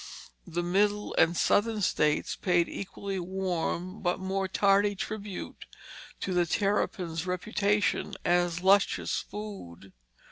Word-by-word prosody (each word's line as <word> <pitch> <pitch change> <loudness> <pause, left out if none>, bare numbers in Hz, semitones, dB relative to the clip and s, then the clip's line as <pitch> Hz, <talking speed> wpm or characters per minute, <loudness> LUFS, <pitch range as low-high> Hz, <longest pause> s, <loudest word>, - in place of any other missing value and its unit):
The 175 +2 -2
Middle 205 +4 +1
and 170 +1 +4
Southern 215 0 +2
states 150 -5 +1
paid 175 -2 +2
equally 195 0 -5
warm 185 0 -3
but 180 0 0
more 190 0 -1
tardy 200 +1 +3
tribute 205 0 -6 0.5
to 190 - -2
the 175 -1 +2
terrapin's 185 -4 -1
reputation 205 +2 0
as 175 0 +1
luscious 195 +1 +3
food. 145 - -9
190 Hz, 110 wpm, -29 LUFS, 175-205 Hz, 0.5 s, and